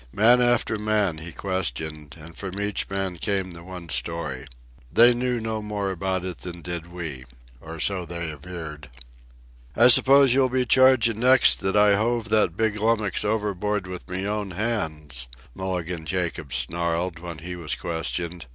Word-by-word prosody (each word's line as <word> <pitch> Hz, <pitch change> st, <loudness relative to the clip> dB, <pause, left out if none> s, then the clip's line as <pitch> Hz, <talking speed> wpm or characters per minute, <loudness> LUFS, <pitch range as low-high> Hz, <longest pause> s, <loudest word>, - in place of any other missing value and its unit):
Man 120 Hz, -, +5 dB
after 120 Hz, -3 st, +2 dB
man 105 Hz, -6 st, 0 dB
he 85 Hz, +2 st, -7 dB
questioned, 80 Hz, -5 st, -3 dB
and 80 Hz, +2 st, -12 dB
from 95 Hz, 0 st, -6 dB
each 105 Hz, -1 st, -2 dB
man 95 Hz, -2 st, -3 dB
came 95 Hz, 0 st, -1 dB
the 85 Hz, -1 st, -9 dB
one 90 Hz, -1 st, -9 dB
story. 85 Hz, -6 st, -2 dB, 0.4 s
They 120 Hz, -, +6 dB
knew 125 Hz, 0 st, -1 dB
no 110 Hz, -1 st, -3 dB
more 105 Hz, -2 st, -3 dB
about 95 Hz, 0 st, -2 dB
it 90 Hz, -2 st, -5 dB
than 85 Hz, -2 st, -8 dB
did 85 Hz, -1 st, -5 dB
we—or 65 Hz, -2 st, -9 dB
so 95 Hz, +2 st, +1 dB
they 85 Hz, -1 st, -5 dB
averred. 75 Hz, -1 st, -9 dB, 0.9 s
"I 120 Hz, +2 st, +7 dB
suppose 135 Hz, +1 st, +6 dB
you'll 130 Hz, -1 st, +3 dB
be 130 Hz, 0 st, 0 dB
chargin' 125 Hz, -3 st, +4 dB
next 130 Hz, +2 st, +5 dB
that 95 Hz, +1 st, 0 dB
I 105 Hz, -1 st, +5 dB
hove 115 Hz, +1 st, -1 dB
that 105 Hz, -6 st, +2 dB
big 110 Hz, -1 st, 0 dB
lummux 110 Hz, -3 st, +1 dB
overboard 105 Hz, -1 st, -1 dB
with 90 Hz, 0 st, -8 dB
me 95 Hz, +2 st, -3 dB
own 105 Hz, -1 st, -2 dB
hands," 80 Hz, -, -2 dB, 0.3 s
Mulligan 90 Hz, -2 st, -4 dB
Jacobs 85 Hz, -5 st, -2 dB
snarled, 85 Hz, +6 st, 0 dB
when 85 Hz, -1 st, -7 dB
he 90 Hz, +3 st, -7 dB
was 80 Hz, -5 st, -3 dB
questioned. 85 Hz, -1 st, -4 dB
95 Hz, 160 wpm, -24 LUFS, 85-110 Hz, 0.9 s, I